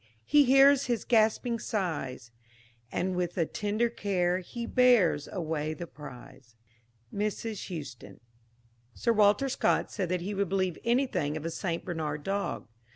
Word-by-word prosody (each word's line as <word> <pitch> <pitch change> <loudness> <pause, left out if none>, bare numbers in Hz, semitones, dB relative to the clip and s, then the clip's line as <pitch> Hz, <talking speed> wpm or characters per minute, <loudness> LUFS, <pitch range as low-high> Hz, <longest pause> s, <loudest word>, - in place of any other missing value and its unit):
he 295 -1 +5
hears 275 +1 +6
his 240 -2 -1
gasping 230 +1 +2
sighs, 160 - -3 0.6
And, 185 +1 -1
with 180 0 -2
a 165 - +2
tender 210 +6 -1
care, 185 -5 0
he 235 +6 -6
bears 230 - +3
away 155 -3 -3
the 170 - -6
prize." 130 -5 -13 0.6
MRS. 210 +1 -3
HOUSTOUN. 145 -8 -8 0.8
Sir 235 - +1
Walter 210 +4 +4
Scott 265 - +1
said 185 -4 -3
that 180 -1 -1
he 200 +4 -4
would 200 -2 -1
believe 185 -3 -1
anything 235 - 0
of 155 - -7
a 165 - -2
St. 170 -1 -3
Bernard 155 -4 -3
dog. 200 -7 -3
190 Hz, 145 wpm, -29 LUFS, 160-230 Hz, 0.8 s, hears